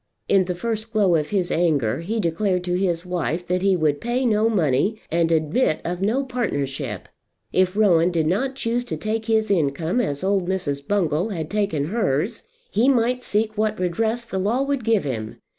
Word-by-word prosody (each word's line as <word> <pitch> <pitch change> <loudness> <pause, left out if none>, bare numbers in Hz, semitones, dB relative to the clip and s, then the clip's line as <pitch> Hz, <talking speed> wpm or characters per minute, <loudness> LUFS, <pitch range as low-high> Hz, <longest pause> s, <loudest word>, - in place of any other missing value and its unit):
In 195 -2 +4
the 180 0 -3
first 220 +3 -3
glow 200 -5 +3
of 150 -2 0
his 190 -4 0
anger 140 -9 +1
he 210 +7 -3
declared 180 +1 0
to 180 0 -2
his 180 -2 0
wife 175 -1 -2
that 180 +1 0
he 195 0 +3
would 155 -4 0
pay 245 +2 0
no 220 -1 +3
money 190 - +1
and 165 0 +2
admit 160 - +1
of 175 +1 -3
no 225 +8 +1
partnership. 140 - -3 0.5
If 185 0 +2
Rowan 180 -5 +4
did 165 -3 0
not 255 - 0
choose 240 -1 -1
to - - -4
take 220 +1 -2
his 220 -2 +1
income 160 - +1
as 145 -9 -3
old 190 -2 +1
Mrs. 145 -7 -2
Bungall 180 -2 +1
had 160 -6 -4
taken 195 -8 0
hers 205 - 0 0.3
he 230 +6 +3
might 250 -1 +2
seek 215 -1 -1
what 215 -1 0
redress 220 +7 0
the 190 -4 -3
law 225 +8 +1
would 275 -3 -1
give 225 -2 +2
him. 110 -6 -4
190 Hz, 190 wpm, -23 LUFS, 165-220 Hz, 0.5 s, In